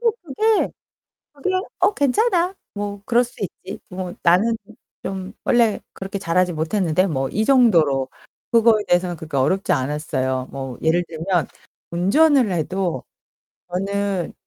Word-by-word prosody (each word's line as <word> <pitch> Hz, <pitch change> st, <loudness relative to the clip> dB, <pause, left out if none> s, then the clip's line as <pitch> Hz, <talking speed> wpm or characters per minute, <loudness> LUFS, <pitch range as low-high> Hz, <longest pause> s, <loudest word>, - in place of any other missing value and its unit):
뭐 470 Hz, -1 st, +3 dB
그게 420 Hz, +8 st, +1 dB, 0.7 s
그냥 375 Hz, 0 st, +1 dB, 0.2 s
'어 380 Hz, +3 st, +3 dB
괜찮아. 360 Hz, -, +2 dB, 0.2 s
뭐 205 Hz, -1 st, -5 dB
그럴 240 Hz, +1 st, +3 dB
수 245 Hz, -, -11 dB
있지. 195 Hz, 0 st, -6 dB
뭐 180 Hz, -1 st, -5 dB
나는 200 Hz, +7 st, +4 dB, 0.5 s
좀 190 Hz, 0 st, -5 dB
원래 235 Hz, -3 st, +3 dB
그렇게 195 Hz, +1 st, -5 dB
자라지 180 Hz, -1 st, +1 dB
못했는데 165 Hz, +2 st, +1 dB
뭐' 135 Hz, -5 st, -1 dB
이 215 Hz, +2 st, 0 dB
정도로 165 Hz, -, +4 dB, 0.4 s
그거에 230 Hz, -2 st, +5 dB
대해서는 175 Hz, 0 st, +2 dB
그렇게 160 Hz, -3 st, -5 dB
어렵지 185 Hz, +9 st, +1 dB
않았어요. 130 Hz, -2 st, -1 dB
뭐 135 Hz, -2 st, -6 dB
예를 165 Hz, +2 st, +2 dB
들면 170 Hz, +1 st, -1 dB, 0.4 s
운전을 240 Hz, -, +4 dB
해도 175 Hz, -3 st, -1 dB, 0.7 s
저는 195 Hz, -1 st, -2 dB
190 Hz, 270 characters per minute, -21 LUFS, 160-230 Hz, 0.7 s, 그거에